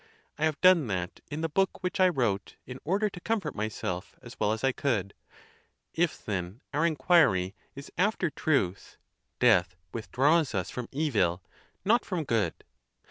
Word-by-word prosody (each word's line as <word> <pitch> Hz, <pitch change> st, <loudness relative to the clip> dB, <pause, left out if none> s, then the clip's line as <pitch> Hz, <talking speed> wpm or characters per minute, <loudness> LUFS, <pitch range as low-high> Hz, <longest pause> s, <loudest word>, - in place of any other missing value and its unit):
I 155 Hz, -, +2 dB
have 155 Hz, -2 st, -1 dB
done 180 Hz, -7 st, +6 dB
that 90 Hz, -3 st, -3 dB
in 155 Hz, +1 st, -4 dB
the 165 Hz, -, 0 dB
book 190 Hz, +5 st, 0 dB
which 180 Hz, +1 st, -2 dB
I 185 Hz, -1 st, +6 dB
wrote, 115 Hz, -, -1 dB
in 130 Hz, 0 st, -8 dB
order 200 Hz, +6 st, +1 dB
to 185 Hz, -, -7 dB
comfort 195 Hz, -6 st, -2 dB
myself 100 Hz, -3 st, -4 dB
as 120 Hz, -2 st, -12 dB
well 105 Hz, -, +2 dB
as 110 Hz, +2 st, -3 dB
I 135 Hz, -, +4 dB
could. 115 Hz, -8 st, -1 dB, 0.8 s
If, 165 Hz, -1 st, -1 dB
then, 95 Hz, +2 st, -4 dB
our 155 Hz, +4 st, +3 dB
inquiry 135 Hz, -, +3 dB, 0.2 s
is 140 Hz, +1 st, -9 dB
after 190 Hz, -4 st, +1 dB
truth, 115 Hz, -, -1 dB, 0.4 s
death 95 Hz, -7 st, +4 dB, 0.2 s
withdraws 135 Hz, +4 st, +2 dB
us 95 Hz, -2 st, -2 dB
from 125 Hz, -2 st, -5 dB
evil, 105 Hz, -, 0 dB, 0.4 s
not 230 Hz, +5 st, +4 dB
from 180 Hz, -5 st, -2 dB
good. 110 Hz, -, -1 dB
135 Hz, 160 wpm, -29 LUFS, 100-165 Hz, 0.8 s, done